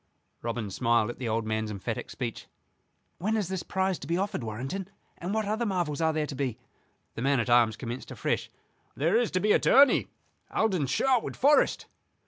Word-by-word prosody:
Robin 115 Hz, -3 st, -3 dB
smiled 115 Hz, +2 st, +2 dB
at -, -, -13 dB
the 120 Hz, -3 st, -2 dB
old 110 Hz, 0 st, 0 dB
man's 110 Hz, 0 st, -1 dB
emphatic 100 Hz, -2 st, -4 dB
speech. -, -, -5 dB, 0.7 s
"When 215 Hz, +6 st, 0 dB
is 200 Hz, -5 st, -1 dB
this 190 Hz, -2 st, -2 dB
prize 190 Hz, -1 st, -1 dB
to 140 Hz, -, -8 dB
be 170 Hz, +2 st, 0 dB
offered, 195 Hz, -8 st, -2 dB
Warrenton, 135 Hz, -, -4 dB, 0.3 s
and 175 Hz, +3 st, -4 dB
what 220 Hz, 0 st, 0 dB
other 215 Hz, +3 st, -1 dB
marvels 175 Hz, -8 st, -1 dB
are 160 Hz, 0 st, +3 dB
there 155 Hz, -1 st, -1 dB
to 145 Hz, -, -6 dB
be?" 130 Hz, -4 st, -2 dB, 0.6 s
The -, -, -6 dB
man 135 Hz, +1 st, +2 dB
at 120 Hz, +1 st, 0 dB
arms 120 Hz, -2 st, +5 dB
commenced 120 Hz, 0 st, -6 dB
afresh. -, -, -2 dB, 0.5 s
"There 165 Hz, +8 st, +1 dB
is 235 Hz, -1 st, +3 dB
to 185 Hz, -, 0 dB
be 210 Hz, +3 st, +2 dB
a -, -, +5 dB
tourney, 275 Hz, +1 st, +5 dB, 0.4 s
held 220 Hz, -2 st, +1 dB
in 150 Hz, -7 st, 0 dB
Sherwood 255 Hz, -, +1 dB
Forest." 290 Hz, +3 st, +3 dB
150 Hz, 195 wpm, -28 LUFS, 120-195 Hz, 0.7 s, arms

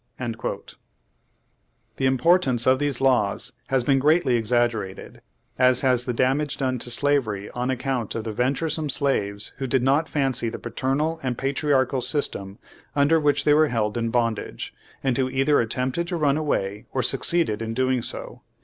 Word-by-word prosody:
^ 115 Hz, -3 st, -5 dB, 1.2 s
The 135 Hz, -, +1 dB
importance 130 Hz, -2 st, +3 dB
of 130 Hz, 0 st, +4 dB
these 145 Hz, -3 st, -1 dB
laws 125 Hz, -2 st, +1 dB, 0.2 s
has 135 Hz, -2 st, +1 dB
been 135 Hz, +2 st, +3 dB
greatly 150 Hz, -1 st, +3 dB
exaggerated, 115 Hz, -4 st, -1 dB, 0.4 s
as 125 Hz, -1 st, +4 dB
has 125 Hz, -2 st, +2 dB
the 125 Hz, -, -1 dB
damage 135 Hz, +4 st, 0 dB
done 130 Hz, -2 st, -1 dB
to 120 Hz, -, -5 dB
slavery 120 Hz, -7 st, 0 dB
on 125 Hz, +1 st, -3 dB
account 130 Hz, -3 st, -2 dB
of 115 Hz, -, -3 dB
the 110 Hz, -1 st, -4 dB
venturesome 145 Hz, +6 st, -1 dB
slaves 105 Hz, -8 st, 0 dB
who 135 Hz, 0 st, -3 dB
did 130 Hz, 0 st, +1 dB
not 140 Hz, +5 st, +2 dB
fancy 135 Hz, -5 st, 0 dB
the -, -, -6 dB
paternal 150 Hz, +5 st, -2 dB
and 125 Hz, -3 st, -2 dB
patriarchial 135 Hz, -1 st, +1 dB
system 120 Hz, -7 st, -2 dB, 0.4 s
under 145 Hz, +3 st, +4 dB
which 150 Hz, -1 st, +2 dB
they 150 Hz, -, +4 dB
were 155 Hz, +1 st, +5 dB
held 110 Hz, -4 st, -1 dB
in 115 Hz, -1 st, -1 dB
bondage, 115 Hz, -, -2 dB, 0.3 s
and 130 Hz, -3 st, +1 dB
who 130 Hz, -1 st, +1 dB
either 135 Hz, +3 st, +2 dB
attempted 130 Hz, +8 st, -1 dB
to 175 Hz, -1 st, -2 dB
run 145 Hz, -3 st, +2 dB
away 110 Hz, -8 st, -2 dB
or 130 Hz, -, -1 dB
succeeded 135 Hz, -3 st, 0 dB
in 115 Hz, 0 st, -4 dB
doing 130 Hz, 0 st, +1 dB
so. -, -, -6 dB
130 Hz, 165 wpm, -24 LUFS, 120-140 Hz, 1.2 s, were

